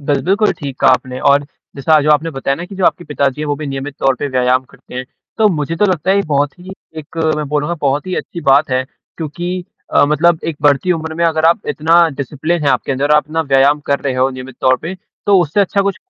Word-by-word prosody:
Bill 140 -1 0
बिल्कुल 200 +4 +2
ठीक 140 -5 -6
कहा - - +5
आपने 130 -1 -2
और 140 +1 +4 0.3
जैसा 155 +3 +3
जो 150 - +2
आपने 150 +2 +2
बताया 135 -1 -2
ना 170 - -6
कि 195 - -10
जो 185 - 0
आपके 175 - +1
पिताजी 140 -2 -1
हैं 155 - -2
वो 145 - 0
भी 150 - -6
नियमित 135 +1 -5
तौर 135 -1 +2
पे - - -2
व्यायाम 130 0 +1
करते 125 - -17
हैं। 130 +1 -4 0.3
तो 220 -1 +5
मुझे 160 -2 -2
तो 210 - +2
लगता 185 -2 0
है 195 - +4
ये 200 - +2
बहुत 145 +2 0
ही 180 +2 -11 0.3
एक 155 +1 -11 0.2
मैं 150 - -2
बोलूँगा 150 +3 -1
बहुत 145 +4 0
ही 185 - -2
अच्छी 170 - -5
बात 140 -1 +3
है, 130 0 +1 0.3
क्योंकि 175 +3 -4 0.3
अ, - - +6
मतलब 160 +3 +3
एक 165 -3 -3
बढ़ती 145 +5 +3
उम्र 160 -1 -4
में 170 +1 0
अगर 160 -1 +1
आप 170 +1 +4
इतना 165 +3 +3
डिसिप्लिन 150 +4 -3
है 145 - +2
आपके 140 - 0
अंदर, 140 +3 -1
आप 150 0 +2
ना 160 +1 0
व्यायाम 140 +1 +3
कर 140 0 +1
रहे 135 -2 -2
हो 130 +1 +2
नियमित 130 -1 -9
तौर 130 0 +3
पे, 170 +4 -4 0.3
तो 200 -1 +5
उससे 170 +4 +1
अच्छा 200 0 +1
कुछ 195 -1 -1
150 Hz, 250 wpm, -16 LUFS, 140-170 Hz, 0.3 s, अ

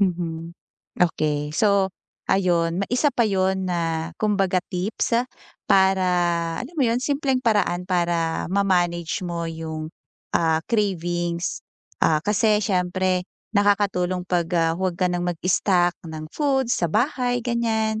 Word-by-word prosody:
Mhm. 170 -3 -1 0.5
Okey, 150 -4 +1
so 200 -2 +3 0.4
ayun, 175 -2 +2
ma - - +1
isa 270 +4 +3
pa 235 - +2
'yun 190 -2 +1
na, 165 -1 -2
kumbaga 195 -4 +2
tips 200 +5 -1 0.5
para 190 -1 +4 0.6
alam 280 +8 -7
mo 275 - +3
'yun, 235 +1 +1
simpleng 270 -1 0
paraan 205 -6 +1
para 170 -2 0
ma-manage 175 -2 +1
mo 170 -1 -3
'yung, 160 -1 -5 0.5
ah, 160 -1 +2
cravings. 175 -5 -1 0.4
Ah, 155 -1 +3
kasi 210 +2 +2
siyempre, 185 -2 0 0.3
nakakatulong 195 -3 +1
'pag, 175 -2 0
ah, 165 -1 +2
huwag 185 -1 -2
ka 180 - +3
ng 175 0 -1
mag-stock 175 +1 +1
ng 155 -1 -7
food 270 -4 +1
sa 175 -8 +1
bahay, 245 0 +1
ganiyan. 225 -2 0
185 Hz, 125 wpm, -23 LUFS, 170-210 Hz, 0.6 s, para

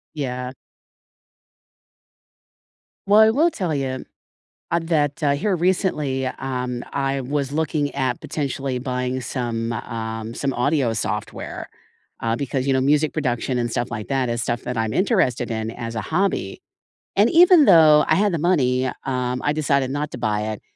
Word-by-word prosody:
Yeah. 125 -3 -4 2.5
Well, 205 +2 +6
I 220 - +7
will 310 +9 +3
tell 175 -5 -2
you, 130 -2 -3 0.7
a 170 - +2
that, 155 -4 0
uh, 145 -1 +3
here 195 +5 0
recently, 165 -7 0
um, 125 -1 -3
I 135 -1 -1
was 140 +1 -2
looking 150 -1 -1
at 130 -3 -1
potentially 135 -3 -3
buying 125 0 -2
some, 120 -2 -3
um, 110 -1 -5
some 140 +2 -2
audio 130 -2 +1
software, 110 - -4 0.5
uh, 115 0 0
because, 135 0 -2
you 135 - +3
know, 130 - +2
music 150 +2 +2
production 125 -3 -1
and 120 -1 -1
stuff 120 0 -2
like 110 -3 -5
that 135 -3 0
is 115 0 -1
stuff 120 0 -2
that 125 -1 -4
I'm 110 -1 -1
interested 185 - +1
in 110 0 -2
as 115 -1 -6
a 110 - -2
hobby, 160 - -1 0.5
and 205 +4 +4
even 345 -2 +7
though 155 -5 +7
I 155 - +4
had 205 +2 +2
the 165 - -1
money, 130 -7 +2 0.2
um, 125 -1 -2
I 145 - +1
decided 140 -3 +1
not 145 +1 -2
to - - -6
buy 105 -2 -1
it - - -9
135 Hz, 160 wpm, -22 LUFS, 125-155 Hz, 2.5 s, I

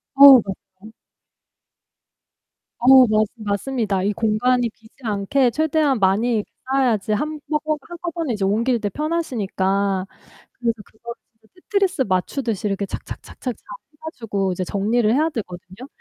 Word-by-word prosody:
어 280 0 +11
맞아요. 195 +2 -10 1.9
어, 260 +1 +7
맞스 215 -1 +1
맞습니다. 210 -2 -2
이 205 - 0
공간이 235 +3 +1
비지 220 0 -22
않게 225 +5 +1
최대한 305 -2 +1
많이 210 +3 +2 0.2
쌓아야지 245 -6 +1
한번 300 +5 -2 0.2
한꺼번에 335 -5 -4
이제 205 -2 -3
옮길 230 +5 +1
때 205 -2 -2
편하시니까 200 - -1 0.5
그래서 235 -2 -1
그거를 235 +2 -10 0.3
이제 - - -24
테트리스 390 -8 0
맞추듯이 210 +3 -1
이렇게 200 0 -2
착착착착 - - -9 0.2
잘 - - -30 0.3
해 - - -28
가지고 205 - -3
이제 185 +1 -3
정리를 215 +4 +1
해야 310 +5 +2
되거든요. 195 - -8
225 Hz, 310 characters per minute, -21 LUFS, 200-270 Hz, 1.9 s, 어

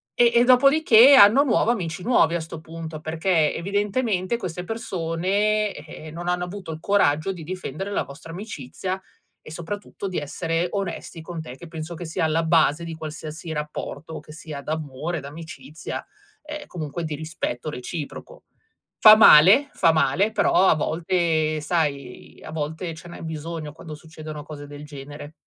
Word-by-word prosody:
E 240 -1 +5
e 240 - +6
dopodiché 270 0 +7
anno 240 +5 +8
nuovo 235 -3 +2
amici 180 -5 -3
nuovi 170 -9 +3
a 170 - -1
sto 165 0 -8
punto, 160 -1 -8
perché 160 0 +1
evidentemente 205 +2 -1
queste 180 -4 -5
persone, 200 +1 -1
eh, 155 +1 -10
non 175 +2 -7
hanno 180 0 0
avuto 180 -2 -7
il 155 - -6
coraggio 195 -3 +2
di 170 -4 -9
difendere 185 +2 -5
la - - 0
vostra 140 +4 -11
amicizia 185 - -5 0.4
e - - -13
soprattutto 200 +4 -6
di 180 - -4
essere 165 +4 -2
onesti 180 -4 -4
con 165 -1 -6
te, 130 -5 -9
che 170 - -11
penso 165 +1 -6
che 175 +1 -7
sia 160 0 -1
alla 160 +1 +1
base 160 -1 +3
di 165 -1 -6
qualsiasi 160 +1 -7
rapporto 150 +1 -5
che 150 - -13
sia 155 -3 -8
d'amore, 155 +1 -4
d'amicizia, 150 0 -8 0.4
ehm, 300 -1 -7
comunque 165 0 -5
di 155 -1 -3
rispetto 155 -3 -4
reciproco. 155 - -7 0.6
Fa 215 0 +11
male, 210 - +8
fa 165 - +4
male, 160 +8 +2
però 205 -3 +4
a - - +5
volte, 160 -1 0
sai, 145 -6 -3
a - - -8
volte 160 +2 -4
ce 170 +2 -12
n'è - - -10
bisogno 160 -1 -5
quando 160 -2 -9
succedono 155 -1 -9
cose 145 -1 -9
del 145 +1 -10
genere. 145 +1 -9
165 Hz, 160 wpm, -24 LUFS, 155-190 Hz, 0.6 s, Fa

